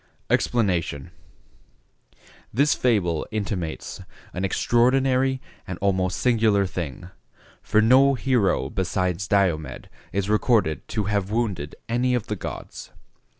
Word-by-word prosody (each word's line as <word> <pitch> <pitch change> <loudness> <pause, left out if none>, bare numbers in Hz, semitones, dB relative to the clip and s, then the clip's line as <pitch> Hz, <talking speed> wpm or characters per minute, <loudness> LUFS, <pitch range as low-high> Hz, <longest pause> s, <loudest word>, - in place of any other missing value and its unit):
EXPLANATION.—This 90 - -3
fable 95 -10 +1
intimates 95 -6 -4 0.3
an 90 - -3
extraordinary 130 +5 +2 0.3
and 90 - -5
almost 95 -2 0
singular 110 -5 +3
thing, 85 -2 -6 0.5
for 110 - +2
no 135 +4 +5
hero 125 -6 +1
besides 90 0 -1
Diomed 90 -6 0 0.2
is 100 +1 -1
recorded 105 - +1
to 105 -1 -2
have 100 -1 -1
wounded 100 -10 -2
any 125 +2 +1
of 120 - -2
the 105 - -3
gods. - - -7
100 Hz, 105 wpm, -24 LUFS, 90-120 Hz, 0.5 s, no